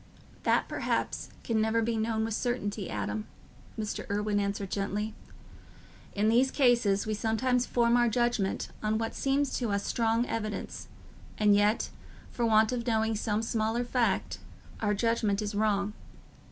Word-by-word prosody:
"That - - +3
perhaps - - -2
can 225 -2 +1
never 220 +1 +2
be 230 +1 0
known 220 0 0
with 225 - -3
certainty, 215 -4 -2
Adam," 105 +1 -3 0.5
Mr. 215 -1 -4
Irwine 205 0 0
answered 200 -1 -2
gently. 205 +2 -2 1.0
"In 205 +1 +2
these 245 +4 +4
cases 235 -8 +3
we 215 - -1
sometimes 240 +3 +1
form 235 -1 +3
our 240 -1 +4
judgment 240 -4 0
on 215 0 +1
what 225 0 -2
seems 275 0 0
to 240 -3 -1
us 200 0 -1
strong 230 0 +1
evidence, 215 -3 -4 0.5
and 210 -1 +5
yet, 205 +2 +2 0.4
for 235 -1 0
want 220 0 +4
of 245 -1 -3
knowing 220 -1 +1
some 215 +1 -1
small 225 0 0
fact, 245 -1 0 0.4
our 210 -1 +1
judgment 220 -2 +1
is 210 -1 -3
wrong. 205 -1 +1
220 Hz, 150 wpm, -29 LUFS, 205-235 Hz, 1.0 s, and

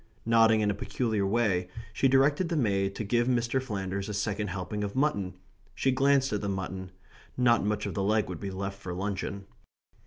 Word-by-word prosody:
Nodding 115 -1 +5
in 105 -1 +2
a - - -1
peculiar 105 0 -1
way, 95 -5 +1 0.2
she 135 - +3
directed 145 +6 +3
the 170 - -1
maid 100 -6 +1
to - - -3
give 120 +3 +1
Mr. 125 +1 +1
Flanders 100 -4 -4
a 105 - -3
second 105 +1 -1
helping 95 +2 -4
of 100 +2 -4
mutton. 100 -10 0 0.4
She 135 - +2
glanced 135 -1 +3
at 105 - -1
the 100 - -2
mutton. 95 -1 -4 0.5
Not 120 -4 +4
much 105 +1 -1
of - - -3
the 100 - -2
leg 105 +2 +2
would 90 -3 -6
be 100 - -4
left 100 +1 -5
for 90 -2 -6
luncheon. 100 +1 -3
105 Hz, 195 wpm, -29 LUFS, 95-120 Hz, 0.5 s, Nodding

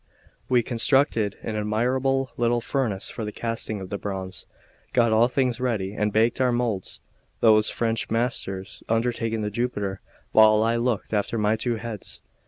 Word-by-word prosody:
We 125 -2 +4
constructed 115 -3 +1
an 110 - -3
admirable 125 +5 0
little 120 0 +2
furnace 115 -6 -1
for 115 - -5
the 105 - -4
casting 115 -2 -3
of 95 0 -8
the 100 - -3
bronze, 95 -2 -5 0.5
got 115 -3 +4
all 115 +2 +5
things 125 -2 0
ready, 110 -6 -1
and 105 0 0
baked 115 +4 +2
our 125 -1 +3
moulds; 120 -6 -2 0.4
those 110 -2 +5
French 115 -1 -1
masters 110 -5 -2
undertaking 115 -1 0
the 105 - -2
Jupiter, 105 -4 -2 0.3
while 110 0 +6
I 115 +1 +2
looked 115 -5 -1
after 105 +2 0
my 105 0 +2
two 120 +1 -1
heads. 110 -2 -6
115 Hz, 160 wpm, -25 LUFS, 105-120 Hz, 0.5 s, while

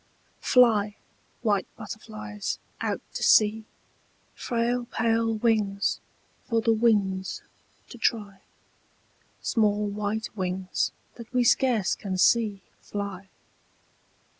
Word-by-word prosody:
FLY, 215 -5 +4 0.5
white 205 -4 +1
butterflies, 215 -1 -6 0.2
out - - -1
to - - -4
sea, 215 0 +4 0.7
Frail 240 +1 -1
pale 225 -1 +1
wings 210 -3 +1 0.4
for 230 -2 0
the 225 0 +3
winds 200 -4 +1 0.5
to 245 - -11
try, 205 -4 -1 1.0
Small 210 -3 +2
white 210 +2 -3
wings 185 -1 -1 0.3
that 235 -1 -10
we 250 -1 +2
scarce 235 -4 +3
can 190 -2 -4
see 205 0 +3 0.2
Fly. 200 -2 -6
215 Hz, 95 wpm, -26 LUFS, 200-230 Hz, 1.0 s, FLY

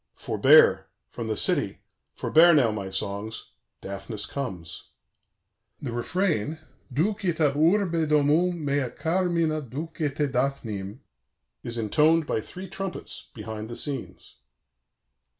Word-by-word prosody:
"Forbear: 475 0 +5 0.2
from - - -5
the - - -1
city - - +1 0.4
forbear 170 +1 +5
now, 125 -7 +4
my 100 -3 -4
songs 100 +3 -4 0.3
Daphnis 100 +2 -4
comes." 90 - -6 0.9
The 130 - -5
refrain 155 - -1 0.3
Ducite 175 - 0
ab 150 -3 +4
urbe 165 0 +2
domum, 155 +3 +2
mea 140 -3 0
carmina, 165 -2 0
ducite 145 +1 -3
Daphnim 120 -5 -2 0.6
is 120 0 -3
intoned 155 +8 +3
by 110 - -1
three 185 - -9
trumpets 195 0 -6
behind 110 0 -6
the 120 - -6
scenes. 135 - -5
145 Hz, 110 wpm, -26 LUFS, 115-165 Hz, 0.9 s, Forbear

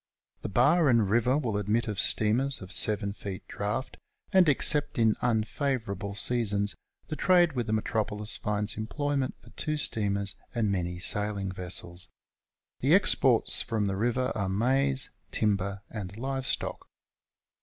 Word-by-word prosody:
The - - -4
bar 140 - +4
and 115 -4 +4
river 120 +6 +2
will 120 -8 -1
admit 105 +4 0
of 105 -3 -3
steamers 120 +7 +2
of 95 -1 -10
7 105 -2 +2
feet 100 -2 -7
draft, 105 +6 -3 0.4
and 185 -4 +6
except 145 +1 +2
in 110 -2 +3
unfavourable 110 -4 -1
seasons, 105 -3 0 0.4
the 155 - -3
trade 175 -2 +4
with 120 -3 -2
the 110 - 0
metropolis 105 -1 -1
finds 105 0 -2
em])loyment 135 +4 -2
for - - -16
two 155 0 -3
steamers 100 -7 0 0.2
and 110 -3 +1
many 90 -2 -2
sailing 100 +1 -1
vessels. 90 0 -3 0.7
The - - +4
exports - - +3
from 110 -2 -1
the 100 -1 -1
river 120 +5 0
are 100 -4 -2
maize, 130 +6 +1 0.2
timber, 100 -2 -1
and 100 -2 -6
live 135 +1 -2
stock. - - -2
110 Hz, 145 wpm, -28 LUFS, 100-130 Hz, 0.7 s, and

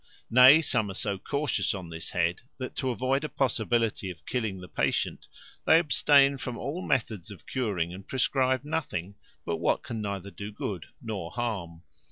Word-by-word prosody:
Nay, 130 +6 +8
some 110 -8 +1
are 95 - -6
so 100 -1 -1
cautious 145 +1 0
on 90 -3 -7
this 80 0 -5
head, 85 0 0 0.2
that, 130 -2 -6
to 130 - 0
avoid 130 +3 0
a 155 - -2
possibility 115 -5 0
of 85 -3 -10
killing 110 -6 -2
the 90 - -9
patient, - - -1 0.4
they 160 - +8
abstain 140 -4 +4
from 125 -2 -4
all 155 +6 -4
methods 110 - -1
of 100 - -12
curing, 100 -10 -1
and 95 +1 -10
prescribe 130 0 +1
nothing 100 - -3 0.3
but - - -1
what - - +1
can 115 -2 -5
neither 100 -1 -4
do 100 +1 -7
good 100 -4 -5 0.2
nor 100 -7 -4
harm. 95 -8 -4
110 Hz, 175 wpm, -28 LUFS, 95-130 Hz, 0.4 s, Nay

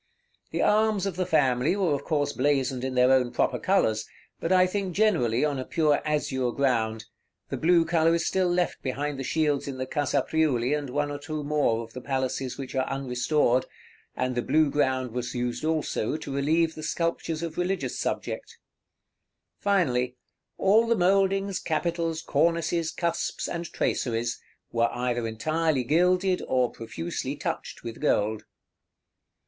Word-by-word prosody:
The - - -1
arms 215 -2 +3
of 195 -4 -2
the 185 -1 -1
family 145 0 +2
were 185 -6 +1
of 140 - -2
course 145 -3 0
blazoned 130 -2 0
in 130 -1 -2
their 125 +1 +5
own 130 -2 +3
proper - - 0
colors, 110 - +1 0.3
but 165 - -2
I 185 0 +6
think 185 -1 -3
generally 150 - +2
on 145 -3 -1
a - - -2
pure 150 +1 +2
azure 135 -4 0
ground; 115 -5 0 0.4
the - - -3
blue 170 0 +4
color 165 0 +3
is 170 - -1
still 185 -1 +1
left 175 0 0
behind 140 +1 -3
the - - -3
shields 150 0 0
in 135 -2 -5
the 130 - -2
Casa 145 +1 0
Priuli 145 -5 +1
and 145 -3 -4
one 145 +2 -1
or 145 - -5
two 150 +1 -5
more 145 -6 +1
of 115 0 -13
the 125 - -7
palaces 130 -1 -2
which 135 -2 -6
are 130 -1 0
unrestored, 130 0 +1 0.5
and 125 0 -1
the 120 - 0
blue 155 +2 +2
ground 130 -3 0
was 125 +1 -4
used 120 +1 -2
also 155 -5 -1
to 140 - -7
relieve 160 +4 +2
the 155 - -8
sculptures 165 0 -2
of 165 -2 -4
religious 185 +2 -1
subject. - - -4 1.0
Finally, 130 -11 +1 0.4
all 220 +4 +4
the 230 - +3
mouldings, 195 +1 +2
capitals, 165 0 -1
cornices, 165 +2 +1
cusps, 170 0 -2
and 170 -1 -5
traceries, 120 0 -1 0.3
were 115 0 +2
either 120 -1 -1
entirely 155 +5 0
gilded 180 +6 +2
or 125 -2 +2
profusely 85 -7 -5
touched - - -5
with 115 -1 -7
gold. 105 +1 +1
145 Hz, 160 wpm, -27 LUFS, 125-170 Hz, 1.0 s, I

